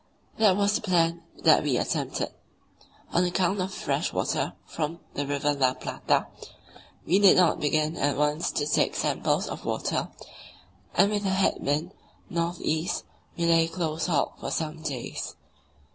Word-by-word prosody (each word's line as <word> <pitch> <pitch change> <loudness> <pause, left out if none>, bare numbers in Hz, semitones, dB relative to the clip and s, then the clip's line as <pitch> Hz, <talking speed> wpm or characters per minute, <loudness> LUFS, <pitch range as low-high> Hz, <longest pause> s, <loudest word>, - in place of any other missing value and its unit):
That 205 -4 +5
was 205 0 +2
the - - 0
plan 170 -4 +2 0.2
that 160 -2 +6
we 140 -4 +1
attempted. - - -1 0.8
On 175 - +4
account 185 +2 +1
of 185 - -1
the 195 - -9
fresh - - -1
water - - -1
from 165 +2 -4
the 145 0 -2
River 145 +1 +1
La 130 -2 +2
Plata, - - 0 0.8
we 185 +5 +3
did 200 -2 +7
not 180 -3 +4
begin 155 +2 +1
at 145 0 +1
once 150 +2 +1
to 145 - 0
take 150 - +1
samples - - 0
of - - -6
water, - - -1 0.9
and 200 +3 +4
with 205 -1 -1
a 195 - 0
head 190 0 +2
wind, 150 +6 -1 0.4
north 170 0 -1
east, 160 +2 -1 0.3
we 170 - 0
lay 165 -1 +4
close 165 -2 -2
hauled 155 -6 +1
for - - -4
some 160 0 -3
days. 140 -6 -5
165 Hz, 160 wpm, -27 LUFS, 150-180 Hz, 0.9 s, did